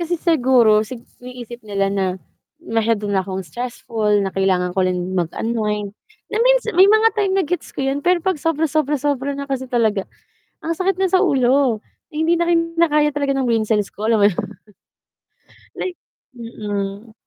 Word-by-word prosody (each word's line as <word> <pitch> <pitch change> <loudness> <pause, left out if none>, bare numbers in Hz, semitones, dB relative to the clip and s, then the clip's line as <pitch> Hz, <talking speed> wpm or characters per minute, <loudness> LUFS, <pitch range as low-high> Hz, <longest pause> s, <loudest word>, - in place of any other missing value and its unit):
kasi 345 +1 -1
siguro 250 -10 +4
sig 240 -1 -9 0.2
iniisip 245 -1 -9
nila 195 -1 0
na 195 -1 0 0.6
masyado 225 -1 0
na 195 -1 +2
akong 190 0 -5
stressful, 225 0 -1
na 190 - -3
kailangan 185 -2 +1
ko 190 - 0
rin 180 0 -2
mag-unwind, 210 +3 -2 0.4
na 430 - 0
minsan - - +3
may 375 +3 +6
mga 435 +2 +5
time 395 -2 +1
na 385 - +2
gets 355 +4 -3
ko 270 - -2
'yun 270 +1 -1
pero 355 +2 +2
pag 370 -6 0
sobra 325 -1 0
sobra 300 -1 +1
sobra 280 0 -1
na 280 - -4
kasi 260 -1 -2
talaga, 220 -5 +1 0.6
ang 330 0 -2
sakit 380 0 0
na 380 -2 +2
sa 375 - +4
ulo, 260 - +2 0.3
hindi 320 +3 +1
na 345 - +1
kinakaya 330 -3 +2
talaga 280 -1 0
ng 265 -1 0
brain 225 -2 +2
cells 210 -2 0
ko, 215 - -5
alam 220 -2 +3
mo 205 - +7
naman 175 - -4 1.3
like, 365 -1 -4 0.4
mm. 210 -2 -5
250 Hz, 175 wpm, -20 LUFS, 210-320 Hz, 1.3 s, mo